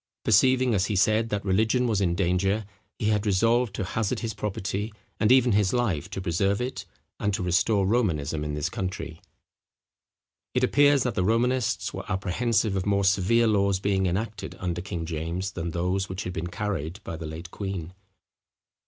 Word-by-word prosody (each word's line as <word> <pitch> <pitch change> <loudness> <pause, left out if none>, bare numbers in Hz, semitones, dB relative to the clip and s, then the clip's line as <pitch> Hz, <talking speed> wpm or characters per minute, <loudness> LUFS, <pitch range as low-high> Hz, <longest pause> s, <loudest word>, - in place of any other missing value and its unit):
Perceiving, 130 +2 +4
as 95 -1 +1
he 105 - -1
said, 110 +4 +3
that 105 -2 -2
religion 110 +6 +2
was 110 -4 +1
in 85 -3 +1
danger, 95 +3 +1 0.3
he 105 - 0
had 105 -1 +1
resolved 115 +2 +2
to - - -2
hazard 100 +3 -2
his 115 -2 -3
property, 105 0 -3 0.3
and 110 - +3
even 125 -2 +5
his 100 -2 +2
life, 95 -9 0
to 100 - -5
preserve 95 +2 0
it, 125 +1 -4 0.3
and 105 -1 0
to - - -3
restore 100 +3 +2
Romanism 80 -9 0
in 75 -1 -3
this 75 +1 -1
country. 90 -3 -5 1.3
It - - +2
appears 145 -2 +4
that 125 - -1
the 90 - 0
Romanists 120 +3 +1
were - - -6
apprehensive 105 +3 0
of 95 +1 -2
more 100 -1 +2
severe 100 +4 +3
laws 100 -3 +2
being 95 -1 +1
enacted 100 +4 -3
under 90 -1 -3
King 85 -3 -4
James 85 +4 -3
than 85 -2 -4
those 90 +3 -1
which 95 +2 -4
had 90 - -5
been 85 0 -3
carried 90 -2 -3
by 85 - -5
the 80 0 -6
late 80 +2 -8
queen. 95 -4 -5
100 Hz, 180 wpm, -26 LUFS, 90-110 Hz, 1.3 s, even